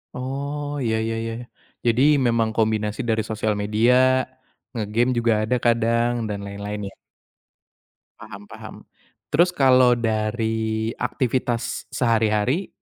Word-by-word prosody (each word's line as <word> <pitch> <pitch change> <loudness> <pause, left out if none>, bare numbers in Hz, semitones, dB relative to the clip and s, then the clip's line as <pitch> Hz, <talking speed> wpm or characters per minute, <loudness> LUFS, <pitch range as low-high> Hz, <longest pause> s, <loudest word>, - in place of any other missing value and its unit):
Oh 140 +3 -4 0.2
Iya 110 -1 +1
ya 115 - -2
ya, 115 - -4 0.5
jadi 120 +1 +2 0.2
memang 115 -2 +2
kombinasi 110 -1 0
dari 110 0 +2
sosial 110 0 -1
media, 110 +4 +2 0.8
ngegame 115 +2 0
juga 115 -1 +2
ada 110 +4 0
kadang 115 0 +2 0.2
dan 100 -1 -3
lain-lain 100 +1 -6
ya. - - -19 1.3
Paham 105 -1 -10
paham, - - -10 0.6
terus 170 +4 +4
kalau 130 -2 +5
dari 110 0 -1
aktivitas 125 -1 -2
sehari-hari, 115 - +1
115 Hz, 110 wpm, -22 LUFS, 110-125 Hz, 1.3 s, kalau